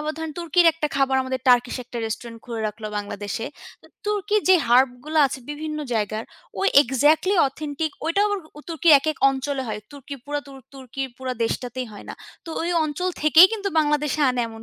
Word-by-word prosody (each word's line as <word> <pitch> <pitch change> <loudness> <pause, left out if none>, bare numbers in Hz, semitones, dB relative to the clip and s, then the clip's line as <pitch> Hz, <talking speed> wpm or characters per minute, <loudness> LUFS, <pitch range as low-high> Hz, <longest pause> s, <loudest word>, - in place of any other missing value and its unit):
আবার 305 +1 -3
ধরেন 320 -1 -5
তুর্কির 345 +1 +3
একটা 320 -2 -2
খাবার 270 -1 +2
আমাদের 260 0 -4
টার্কিশ 245 0 +4
একটা 240 0 -7
রেস্টুরেন্ট 230 +1 -6
খুলে 230 -2 -5
রাখলো 215 +1 -6
বাংলাদেশে। 205 +1 -4 0.6
তুর্কির 415 0 0
যে 375 - +8
হার্বগুলা 260 +5 +2
আছে, 265 - -6
বিভিন্ন 305 +1 -5 0.2
জায়গায় 215 0 -2 0.4
ওই 390 - +3
এক্সাক্টলি 295 - +2
অথেন্টিক 300 +2 -4 0.2
ওইটা 335 +5 +1
আবার 410 -1 -1 0.3
তুর্কির 330 0 +3
১-১ 310 +2 -3
অঞ্চলে 270 0 -3
হয়। 210 -1 -4
তুর্কি 285 0 -9
পুরা 290 0 -3
তু - - -12 0.2
তুর্কির 265 0 -6
পুরা 260 -1 -3
দেশটাতেই 250 +2 -3
হয় 205 - -11
না। - - -6 0.3
তো - - -12
ওই 345 - -1
অঞ্চল 310 +5 -2
থেকেই 310 +4 +8
কিন্তু 405 -3 -2
বাংলাদেশে 300 -1 +1
আনে, 250 -1 -1
এমন 225 0 -11
275 Hz, 175 wpm, -23 LUFS, 245-315 Hz, 0.6 s, যে